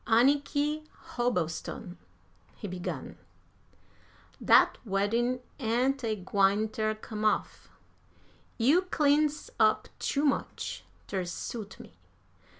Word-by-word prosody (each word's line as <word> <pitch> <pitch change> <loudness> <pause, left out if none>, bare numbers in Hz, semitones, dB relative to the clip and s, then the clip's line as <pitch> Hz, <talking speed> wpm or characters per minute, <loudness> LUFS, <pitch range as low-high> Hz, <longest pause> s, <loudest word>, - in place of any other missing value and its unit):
"Anniky 290 +5 +2 0.3
Hobbleston," 185 - -2 0.6
he - - -7
began, 180 -1 -5 1.2
"dat - - +5
weddin' 230 +4 0 0.2
ain't 255 +3 +1
a 220 -2 0
gwine 200 +2 +2
ter 215 0 -1
come 215 0 -6
off. 215 - 0 0.9
You 280 +10 +4
cleans 300 -1 +2
up 215 -1 +3
too 285 +1 0
much 280 - -2 0.2
ter 190 -2 -2
suit 205 +4 -6
me. - - -14
230 Hz, 95 wpm, -29 LUFS, 205-275 Hz, 1.2 s, dat